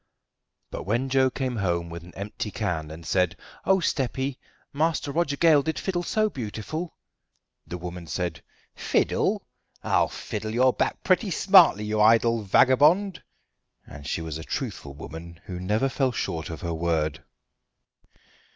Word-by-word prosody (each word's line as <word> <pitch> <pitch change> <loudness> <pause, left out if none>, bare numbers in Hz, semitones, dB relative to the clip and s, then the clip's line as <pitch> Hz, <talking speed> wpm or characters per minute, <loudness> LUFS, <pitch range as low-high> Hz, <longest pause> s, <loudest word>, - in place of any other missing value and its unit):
But - - -5
when 120 +6 0
Joe 130 0 +4
came 130 -2 -3
home 85 -4 0
with 85 0 -7
an 90 - -14
empty 105 +2 -5
can 85 -8 -3
and 80 +1 -10
said: 90 0 +1 0.3
"Oh, 190 - +5
steppy, 135 -4 -1 0.3
Master 155 0 0
Roger 145 -2 0
Gale 160 -3 +5
did 160 +3 -3
fiddle 180 -2 -1
so 215 +5 +1
beautiful!" 140 - -5 0.7
the 90 - -5
woman 90 -1 -7
said: 90 +1 -3 0.3
"Fiddle! - - 0 0.4
I'll - - +2
fiddle 110 +1 -5
your 130 +1 +4
back - - -1
pretty 190 +3 +2
smartly, 180 - +6
you 105 0 0
idle 115 +1 +4
vagabond"; 150 - +4 0.6
and 75 -1 -10
she 80 - -2
was 80 -1 -5
a - - -7
truthful 70 -3 -5
woman 80 +2 -9
who 90 -2 -6
never 105 +8 +1
fell 135 -1 0
short 80 -8 -3
of 80 - -7
her 85 -2 -3
word. 80 -2 -1
110 Hz, 150 wpm, -26 LUFS, 85-140 Hz, 0.7 s, smartly